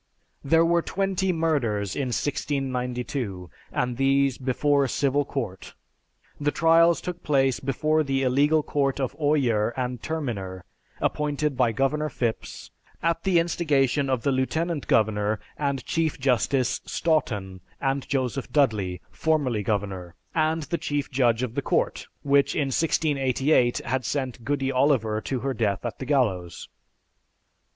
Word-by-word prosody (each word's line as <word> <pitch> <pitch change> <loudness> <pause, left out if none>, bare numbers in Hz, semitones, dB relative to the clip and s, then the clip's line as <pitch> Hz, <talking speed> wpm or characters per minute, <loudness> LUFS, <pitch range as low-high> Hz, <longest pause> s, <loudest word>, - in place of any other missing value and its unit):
There 165 +4 +4
were 170 0 +3
twenty 190 0 -1
murders 130 - 0
in 140 -2 -1
1692, 125 - -3 0.2
and 125 -1 -1
these 135 -1 +2
before 140 +2 +2
a 135 - -1
civil 140 +2 +1
court. 110 -11 -5 0.6
The 145 0 +1
trials 165 +2 +4
took 180 -1 -5
place 135 -4 +2
before 155 +4 +1
the 135 -2 0
illegal 145 +4 +3
Court 140 -2 0
of 130 -2 -2
Oyer 130 -8 +2
and 125 -2 -3
Terminer, 100 - -4 0.3
appointed 150 -1 -1
by 125 -2 +2
Governor 145 +6 0
Phipps, 120 -5 -4 0.3
at 165 0 +1
the 190 -2 +3
instigation 145 -5 +1
of 130 -3 0
the 140 - +2
Lieutenant 155 +4 -1
Governor 105 -1 +2 0.2
and 140 -3 -2
Chief 165 -4 -1
Justice 130 0 +1
Stoughton, 105 - -1 0.2
and 135 0 -1
Joseph 135 -1 -2
Dudley, 105 - +1
formerly 130 - 0
governor, 95 -4 -3 0.2
and 160 0 +1
the 170 +3 -3
Chief 145 -2 -2
Judge 125 -3 +2
of 120 -3 -3
the - - -1
Court - - -1 0.2
which, 140 0 +3
in 140 -3 0
1688, 135 -3 +2
had 130 +1 -1
sent 130 -4 -3
"Goody 135 0 -1
Oliver" 125 -5 +2
to 130 0 -3
her 135 0 -1
death 100 -6 -1
at - - -4
the 130 - -6
gallows. 100 - 0
135 Hz, 140 wpm, -25 LUFS, 120-150 Hz, 0.6 s, There